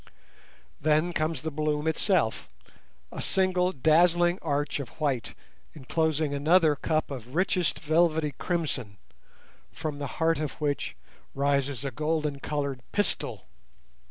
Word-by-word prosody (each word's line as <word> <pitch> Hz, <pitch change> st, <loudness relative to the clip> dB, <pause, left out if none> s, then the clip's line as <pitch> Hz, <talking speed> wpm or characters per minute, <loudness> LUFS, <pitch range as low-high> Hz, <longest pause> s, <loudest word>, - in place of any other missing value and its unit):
Then 155 Hz, +3 st, +2 dB
comes 155 Hz, -4 st, -1 dB
the 160 Hz, -, -2 dB
bloom 150 Hz, 0 st, -1 dB
itself, 160 Hz, -, +1 dB, 0.6 s
a -, -, -5 dB
single 185 Hz, -1 st, +2 dB
dazzling 175 Hz, +4 st, +3 dB
arch 145 Hz, -2 st, -1 dB
of 135 Hz, -5 st, -5 dB
white 140 Hz, -6 st, -1 dB, 0.4 s
enclosing 155 Hz, +1 st, 0 dB
another 155 Hz, +2 st, +4 dB
cup 155 Hz, +1 st, -1 dB
of 125 Hz, 0 st, -7 dB
richest 180 Hz, -1 st, +1 dB
velvety 160 Hz, -1 st, +2 dB
crimson, 140 Hz, -, -3 dB, 0.7 s
from 150 Hz, -2 st, -5 dB
the 140 Hz, -, -3 dB
heart 165 Hz, -1 st, +2 dB
of 155 Hz, -3 st, -2 dB
which 145 Hz, -2 st, -2 dB, 0.4 s
rises 140 Hz, -1 st, 0 dB
a 135 Hz, -, -2 dB
golden 150 Hz, +1 st, -1 dB
coloured 140 Hz, -3 st, -3 dB
pistil. 205 Hz, -1 st, -1 dB
155 Hz, 120 wpm, -28 LUFS, 140-165 Hz, 0.7 s, another